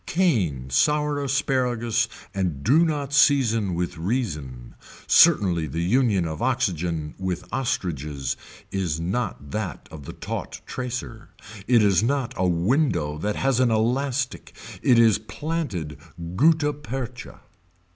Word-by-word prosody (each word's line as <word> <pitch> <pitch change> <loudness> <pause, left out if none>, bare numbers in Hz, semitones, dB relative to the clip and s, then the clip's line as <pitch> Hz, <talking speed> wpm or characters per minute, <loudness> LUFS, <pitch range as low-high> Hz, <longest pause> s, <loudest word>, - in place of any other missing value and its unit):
Cane 95 - 0
sour 150 - +2
asparagus 125 -4 0 0.3
and 90 -8 -2
do 155 +6 +5
not 145 -4 -2
season 115 - +3
with 90 -1 -3
reason. 75 - -3 0.3
Certainly 95 - +5
the 80 +4 -3
union 100 -3 +2
of 80 +5 -5
oxygen 90 -11 -1
with 95 -2 -3
ostriches 75 - -2 0.4
is 90 -5 -1
not 90 - -3
that 110 -4 -4
of 75 -3 -10
the - - -7
taught - - -6
tracer. 125 -1 -6 0.4
It 120 -3 +5
is 100 -3 +4
not 125 +1 0
a 90 - +1
window 85 - +1
that 105 +4 -1
has 135 -2 +1
an 130 -2 +4
elastic 125 +4 -1 0.3
it 125 - +4
is 115 -3 +5
planted 105 - -4 0.4
gutta 150 - +3
percha. 130 -4 -7
110 Hz, 125 wpm, -24 LUFS, 85-135 Hz, 0.4 s, do